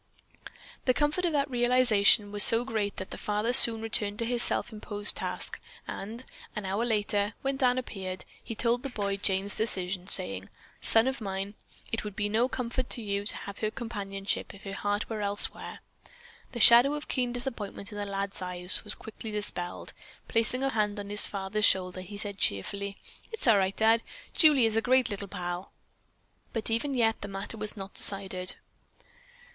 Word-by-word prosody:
The 255 - +3
comfort 300 +5 0
of 345 - +1
that 285 -1 +1
realization 240 -5 +4
was 205 0 +6
so 230 +2 +7
great 215 -5 -2
that 190 - -7
the - - -7
father 210 +3 -1
soon 230 -3 +7
returned 210 -2 +2
to 230 - 0
his 240 0 +2
self 240 - 0
imposed 205 -1 +2
task, - - -4 0.3
and, 225 +5 -6 0.3
an 210 - -4
hour 195 +4 -1
later, 210 -2 0
when 270 0 0
Dan 255 -2 +2
appeared, 190 -7 -5 0.2
he 225 - -6
told 240 +2 +1
the 275 - -5
boy 200 -5 -2
Jane's 195 0 0
decision, 185 -4 -1
saying: - - +1 0.3
"Son 225 +1 +4
of 265 -2 -2
mine, 195 0 -4 0.4
it 225 - -2
would 210 -2 -7
be 205 -1 -1
no 230 +4 +2
comfort 250 0 -3
to 240 - -2
you 200 -1 -2
to - - +3
have 200 - -8
her 215 - 0
companionship 200 -5 -4
if 200 - -15
her 195 - -6
heart 205 +1 -2
were 220 -2 -4
elsewhere." 205 0 -1 0.7
The 240 - -5
shadow 240 +6 +8
of 295 - -7
keen 250 -2 -1
disappointment 230 -4 -5
in 205 - -6
the 205 - -2
lad's 195 0 -4
eyes 180 0 0
was 210 -1 +1
quickly 220 0 -9
dispelled. 205 -4 -4 0.3
Placing 230 +3 0
a 270 - +2
hand 210 -4 -1
on 200 0 -7
his 210 - +7
father's 200 +1 -1
shoulder 185 -1 +1
he 200 +3 -9
said 200 -1 -6
cheerfully, 200 - -1 0.3
"It's 450 - +3
all 225 -5 +6
right, 190 0 -1
Dad. 225 +1 +4 0.3
Julie 295 -7 +6
is 220 -1 +1
a 225 - +3
great 255 -1 +2
little 200 0 -5
pal." 180 -1 -6 0.8
But 225 -1 -3
even 265 +5 0
yet 225 -2 +1
the 205 - -5
matter 195 +2 -4
was 215 0 0
not 195 0 -8
decided. 190 -2 -1
210 Hz, 185 wpm, -28 LUFS, 200-235 Hz, 0.8 s, shadow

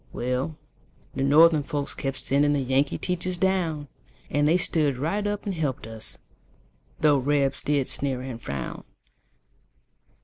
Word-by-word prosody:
Well, 125 +5 -2 0.6
the - - -3
Northern 155 +3 +6
folks 140 0 -3
kept 135 -1 -3
sending 145 +2 +2
The 140 -2 0
Yankee 135 +2 +1
teachers 180 0 -1
down; 170 -6 0 0.4
And 145 0 +2
they 165 +3 +4
stood 150 -6 +1
right 200 +10 -1
up 205 0 -3
and 200 - -2
helped 150 -9 -2
us, 110 -1 -5 0.8
Though 150 -2 +5
Rebs 140 0 +1
did 145 -3 0
sneer 135 -3 -1
and 130 -3 -7
frown. 70 - -5
145 Hz, 140 wpm, -26 LUFS, 135-165 Hz, 0.8 s, Northern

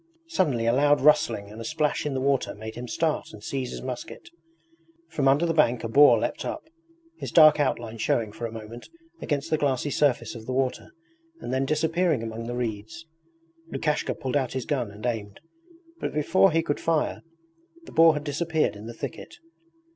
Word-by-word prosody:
Suddenly 150 - 0
a 115 - +3
loud 145 +2 +4
rustling 125 -8 +3
and 110 +2 -9
a - - -5
splash 150 +5 -1
in 140 - -3
the 130 - -1
water 135 0 0
made 110 +1 -8
him 125 +1 -7
start 160 +4 -1
and 105 -1 -12
seize 130 0 -3
his - - -7
musket. 130 - -7 0.8
From 135 -2 0
under 140 +5 +4
the 165 - 0
bank 125 -7 +2
a - - -1
boar 130 +1 +6
leapt 115 - -2
up - - -4 0.6
his - - -5
dark 155 -2 +7
outline 120 -5 -1
showing 110 0 0
for 115 +2 -5
a - - -10
moment 115 +1 -9 0.3
against 145 +1 -2
the 155 - +2
glassy 140 0 0
surface 140 -4 +1
of 115 -2 -10
the 130 - -2
water 130 0 -1 0.5
and 125 - -5
then 135 +1 0
disappearing 160 -2 +1
among 115 0 -5
the 120 - -4
reeds. 115 +6 -5 0.7
Lukashka 150 -1 -1
pulled 130 +1 -4
out 135 -3 0
his 130 -2 -3
gun 130 -7 -1
and 105 +3 -10
aimed, 105 -4 -3 0.6
but - - -4
before 165 +6 +4
he 165 +1 +1
could 145 - -2
fire 165 -2 0 0.6
the - - -12
boar 165 -1 +6
had 150 - -3
disappeared 155 -1 0
in 105 +2 -9
the 115 - -8
thicket. - - -7
135 Hz, 190 wpm, -26 LUFS, 115-150 Hz, 0.8 s, dark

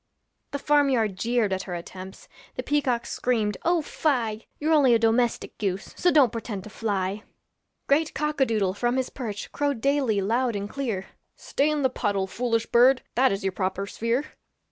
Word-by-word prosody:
The 285 - -3
farm 290 0 +3
yard 220 -7 +1
jeered 230 0 0
at 190 - -1
her 175 - -3
attempts, 185 +2 -9 0.3
The - - -3
peacocks 265 -5 0
screamed, 220 -4 0
'Oh 340 -1 +2
fie! 230 -9 -1
You're 310 +2 +1
only 270 -6 +5
a - - +6
domestic 230 +1 +1
goose, 195 -2 -3
So 355 - +2
don't 285 -9 +5
pretend 220 -4 -5
to 215 - -11
fly.' 200 -2 -2 0.6
Great 305 +3 +2
cock 300 0 -1
a - - +6
doodle 205 -5 +1
from 240 +5 0
his 260 -1 -1
perch 215 -6 -6
Crowed 285 -4 -1
daily 270 -5 +1
loud 230 +4 0
and 200 0 -3
clear, 220 -7 -3 0.3
'Stay 285 +2 0
in 300 -2 0
the 260 - +4
puddle, 200 -5 -1
foolish 230 +3 -1
bird, 250 +2 +4
That 260 +2 +3
is 195 0 -3
your 190 - 0
proper 190 +1 -2
sphere.' 230 +7 -1
235 Hz, 185 wpm, -25 LUFS, 205-275 Hz, 0.6 s, a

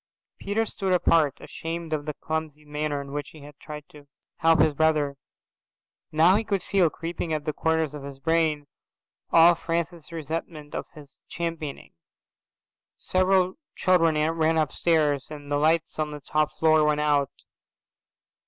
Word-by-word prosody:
Peter 215 +3 0
stood 190 -3 -2
apart, 165 -5 +3
ashamed 165 0 -6
of 150 -1 -3
the 150 - -3
clumsy 155 -1 -4
manner 150 0 -2
in 140 0 -9
which 145 0 -4
he 155 - -14
had 145 0 -12
tried 150 -1 -9
to 145 -1 -16 0.3
help 165 0 +4
his 155 0 +4
brother. 150 -2 +2 1.0
Now 165 +5 +5
he 220 - -1
could 200 -4 -1
feel, 185 -4 +3
creeping 165 +2 -5
in 160 - 0
at 150 -1 -5
the 155 - -1
corners 160 -2 0
of 150 - -7
his 140 -1 -8
brain, 160 0 +1 0.7
all 170 +1 +7
Francis's 170 0 -3
resentment 160 -1 -5
of - - -4
his 145 -3 -15
championing. 165 -4 -5 1.0
Several 185 - +1 0.2
children 165 -4 +3 0.2
ran 160 0 +1
upstairs, 155 -3 +1
and 145 -2 -9
the 145 - +2
lights 160 +2 +1
on 155 -1 0
the 150 0 -7
top 150 +2 0
floor 155 -1 +4
went 150 0 +2
out. 145 -2 +2
155 Hz, 155 wpm, -26 LUFS, 150-165 Hz, 1.0 s, all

